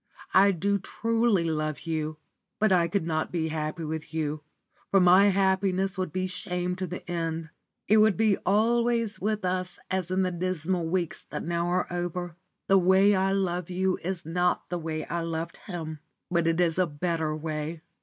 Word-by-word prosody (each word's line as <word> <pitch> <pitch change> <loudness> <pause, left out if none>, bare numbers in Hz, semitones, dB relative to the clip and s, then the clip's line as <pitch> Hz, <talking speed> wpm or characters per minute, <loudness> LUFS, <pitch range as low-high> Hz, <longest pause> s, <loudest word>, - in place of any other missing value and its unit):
I 195 +1 +7
do 200 +2 +1
truly 225 -1 +1
love 155 -2 -2
you, 155 -2 -3 0.4
but 215 -2 +2
I 175 -2 +4
could 170 0 -1
not 160 -1 -1
be 160 -2 -1
happy 155 +1 -3
with 160 0 -5
you, 155 -1 -2 0.5
for 195 - +5
my 185 +2 +7
happiness 190 0 +2
would 185 -4 -2
be 185 +3 -1
shame 180 -1 -3
to 185 -1 -3
the 180 +2 -7
end. 165 -2 -3 0.4
It 215 - +5
would 215 -2 +5
be 215 -3 +3
always 230 +1 +1
with 210 0 -1
us 185 0 -2
as 185 -2 -1
in 185 +1 +1
the 185 - 0
dismal 175 -1 -1
weeks 175 -1 -1
that - - -5
now 170 +1 -1
are 180 +1 +1
over. 175 -1 -3 0.3
The 195 0 +6
way 190 +3 +5
I 190 0 +2
love 180 -3 -1
you 185 +1 0
is 180 -1 -4
not 175 +2 0
the 175 - -1
way 160 -1 -4
I 170 - -2
loved 165 0 -4
him, 160 -5 -5 0.3
but 170 -1 +2
it 165 +1 +1
is 175 0 +2
a 185 - +3
better 160 0 -1
way. 155 +1 -4
180 Hz, 185 wpm, -27 LUFS, 165-190 Hz, 0.5 s, I